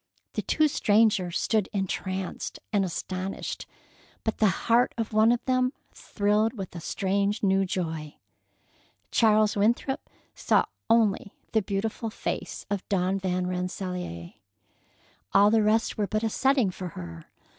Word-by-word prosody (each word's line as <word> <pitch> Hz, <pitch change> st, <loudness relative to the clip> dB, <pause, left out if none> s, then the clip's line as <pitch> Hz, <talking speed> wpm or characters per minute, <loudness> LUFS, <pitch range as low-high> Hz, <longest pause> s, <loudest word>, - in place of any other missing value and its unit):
The -, -, -1 dB
two 310 Hz, -1 st, +2 dB
strangers 205 Hz, -, +2 dB
stood 215 Hz, -4 st, +1 dB
entranced 190 Hz, -1 st, -3 dB, 0.2 s
and 200 Hz, -1 st, +3 dB
astonished; 185 Hz, +1 st, -4 dB, 0.6 s
but 220 Hz, -, -2 dB
the 215 Hz, -, +5 dB, 0.2 s
heart 240 Hz, +2 st, +3 dB
of 225 Hz, -1 st, -3 dB
one 220 Hz, +2 st, +5 dB
of 240 Hz, -, 0 dB
them 255 Hz, 0 st, +2 dB, 0.2 s
thrilled 210 Hz, +2 st, 0 dB
with 195 Hz, -6 st, -7 dB
a -, -, -4 dB
strange 200 Hz, +5 st, -1 dB
new 195 Hz, 0 st, +3 dB
joy. 160 Hz, -5 st, -3 dB, 1.0 s
Charles 215 Hz, -2 st, +4 dB
Winthrop 235 Hz, +6 st, 0 dB, 0.2 s
saw -, -, +2 dB, 0.2 s
only 220 Hz, -3 st, +2 dB, 0.2 s
the 220 Hz, -, +3 dB
beautiful 210 Hz, +3 st, -2 dB
face -, -, -4 dB
of 200 Hz, -1 st, -4 dB
Dawn 190 Hz, 0 st, +1 dB
Van 185 Hz, -1 st, -1 dB
Rensselaer. 180 Hz, -, -4 dB, 1.0 s
All 200 Hz, +1 st, +6 dB
the 225 Hz, 0 st, +4 dB
rest 215 Hz, +1 st, +1 dB
were 205 Hz, -, +1 dB
but 215 Hz, +2 st, -1 dB
a 225 Hz, -, 0 dB
setting 265 Hz, -6 st, +2 dB
for 180 Hz, 0 st, -6 dB
her. 85 Hz, -2 st, -8 dB
200 Hz, 135 wpm, -27 LUFS, 185-220 Hz, 1.0 s, All